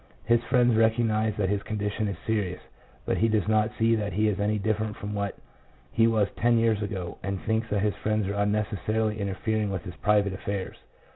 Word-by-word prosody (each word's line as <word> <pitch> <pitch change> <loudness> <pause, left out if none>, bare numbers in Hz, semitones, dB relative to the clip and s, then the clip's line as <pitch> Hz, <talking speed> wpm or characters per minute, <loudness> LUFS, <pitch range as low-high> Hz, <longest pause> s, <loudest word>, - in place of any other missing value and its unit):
His 120 0 +4
friends 120 0 +3
recog 110 +1 +3
nize 110 -1 0
that 95 -3 0
his 100 0 0
condition 105 0 -2
is 100 - -3
serious, 100 -5 -1 0.5
but - - 0
he 115 - +3
does 110 -3 +1
not 110 0 +3
see 115 0 +3
that 105 -3 -1
he 105 +3 +2
is 105 -1 0
any 105 +1 +1
different 110 0 -1
from 105 +1 -5
what 100 -1 -3 0.5
he 115 0 +4
was 110 -3 +2
ten 120 0 +3
years 115 -2 +2
ago, 95 -4 -4
and 100 -1 -3
thinks 110 +1 0
that 105 -1 0
his 105 -1 +1
friends 110 -1 0
are 100 - -2
unnecessarily 105 +1 0
interfering 105 +2 -1
with 95 -4 -3
his 90 - -7
private 100 -2 +2
affairs. 100 0 -4
105 Hz, 205 wpm, -27 LUFS, 100-110 Hz, 0.5 s, His